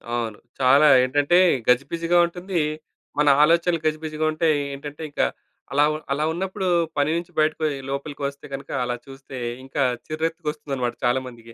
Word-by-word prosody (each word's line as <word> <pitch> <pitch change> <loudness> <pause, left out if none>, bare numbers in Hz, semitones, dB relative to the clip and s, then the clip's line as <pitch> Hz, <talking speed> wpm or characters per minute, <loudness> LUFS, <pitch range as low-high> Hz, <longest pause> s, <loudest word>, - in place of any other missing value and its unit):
అవును. 115 -3 -3 0.2
చాలా 135 +4 +6 0.2
ఏంటంటే, 145 +6 +3 0.3
గజిబిజిగా 165 +7 +2
ఉంటుంది. 175 +1 -3 0.6
మన 150 - +3 0.2
ఆలోచనలు 170 +1 +3
గజిబిజిగా 155 0 -1
ఉంటాయి. 155 -1 +2 0.2
ఏంటంటే, 145 +2 -9
ఇంక - - -1 0.5
అలా 145 +2 +4
వ - - -3 0.2
అలా 150 +2 +1
ఉన్నప్పుడు 190 +2 -3 0.3
పని 145 +1 +2
నుంచి 170 +1 -4
బయటకొయ్ 155 -1 +1 0.2
లోపలికి 140 +1 -5
వస్తే 140 0 -9
గనక 135 - -6
అలా 125 0 -2
చూస్తే 135 -1 -10 0.3
ఇంకా 135 +1 -3 0.3
చిర్రెత్తు‌కొస్తుందన్నమాట 150 -6 -3
చాలా 125 +2 +3
మందికి. 115 -1 -12
150 Hz, 140 wpm, -23 LUFS, 135-165 Hz, 0.6 s, చాలా